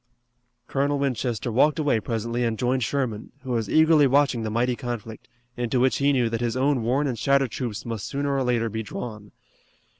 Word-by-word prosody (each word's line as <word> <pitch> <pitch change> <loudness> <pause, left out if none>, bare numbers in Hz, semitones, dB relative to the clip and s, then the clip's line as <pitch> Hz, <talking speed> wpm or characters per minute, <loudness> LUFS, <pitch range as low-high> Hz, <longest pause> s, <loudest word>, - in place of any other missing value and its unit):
Colonel 140 +1 0
Winchester 125 -4 -1
walked 145 +6 +3
away 145 -7 +2
presently 115 +2 -2
and 115 -2 0
joined 125 +2 0
Sherman, 115 -4 -2
who 130 - -5
was 115 -4 -1
eagerly 155 -2 +5
watching 135 -2 +2
the 110 - -2
mighty 120 +3 0
conflict, 115 -3 -6 0.3
into 120 0 -1
which 130 +1 +3
he 140 +1 +3
knew 125 -4 +2
that 115 0 -2
his 120 +1 -1
own 135 -1 +2
worn 130 +6 +1
and 125 -5 -2
shattered 140 -3 +2
troops 120 -3 -4
must 115 -4 -4
sooner 140 0 -1
or 135 - +1
later 120 -2 +1
be 110 0 -3
drawn. 105 -1 -7
125 Hz, 190 wpm, -25 LUFS, 115-140 Hz, 0.3 s, eagerly